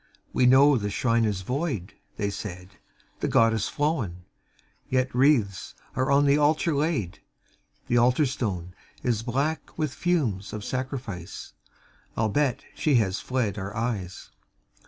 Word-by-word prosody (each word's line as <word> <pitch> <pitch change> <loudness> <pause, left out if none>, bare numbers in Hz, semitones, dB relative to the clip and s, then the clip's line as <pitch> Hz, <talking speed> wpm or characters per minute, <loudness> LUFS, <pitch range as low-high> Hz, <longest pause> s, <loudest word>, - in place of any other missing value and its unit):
"We 125 - +4
know 135 +2 +6
the 105 -2 -2
Shrine 115 +2 +1
is 100 -3 -1
void," 125 - -2 0.2
they 100 -1 -1
said, 95 -3 -7 0.5
"The - - -1
Goddess 115 -2 +3
flown 130 - -1 0.7
Yet 130 0 +1
wreaths 125 - +2 0.2
are 130 +1 0
on 140 +1 +4
the 140 +1 +4
Altar 155 +2 +2
laid 140 - -1 0.7
The 120 - +1
Altar 125 +5 +4
Stone 95 -9 -3 0.3
Is 120 -3 +1
black 140 +7 -2
with 155 -4 -1
fumes 125 - -1
of 105 -1 -5
sacrifice, 130 - -5 0.6
Albeit 125 +5 +1
She 150 -3 +1
has 100 -4 +2
fled 115 -6 -1
our 100 +2 -5
eyes. 105 -6 -3
120 Hz, 135 wpm, -26 LUFS, 100-140 Hz, 0.7 s, know